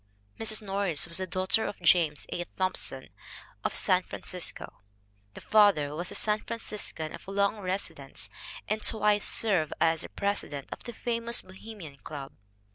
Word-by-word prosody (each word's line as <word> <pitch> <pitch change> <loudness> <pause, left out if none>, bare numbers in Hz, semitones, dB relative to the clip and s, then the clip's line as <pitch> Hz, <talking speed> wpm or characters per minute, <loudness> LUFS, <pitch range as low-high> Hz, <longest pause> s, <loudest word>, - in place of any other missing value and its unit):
Kathleen 220 -1 +2
Norris 195 -5 +2
was 170 - -1
the 185 - -2
daughter 185 +5 +2
of - - -6
James 165 -4 +3
A. 175 - -2
Thompson, 185 0 0 0.5
of - - -1
San 185 -2 +4
Francisco. 180 - -3 0.5
The - - -9
father 200 -10 +4
was 175 +3 -2
a - - -2
San 210 0 +2
Franciscan 210 -8 -4
of - - -10
long 200 +2 +1
residence 190 0 -3 0.4
and 215 0 -1
twice 210 -2 +3
served 190 -9 +2
as 165 -1 +3
presi 200 0 0
dent 140 -2 -7
of - - -7
the 240 - -6
famous 235 0 0
Bohemian 185 -6 -10
Club. 140 -1 -8
190 Hz, 150 wpm, -29 LUFS, 165-210 Hz, 0.5 s, San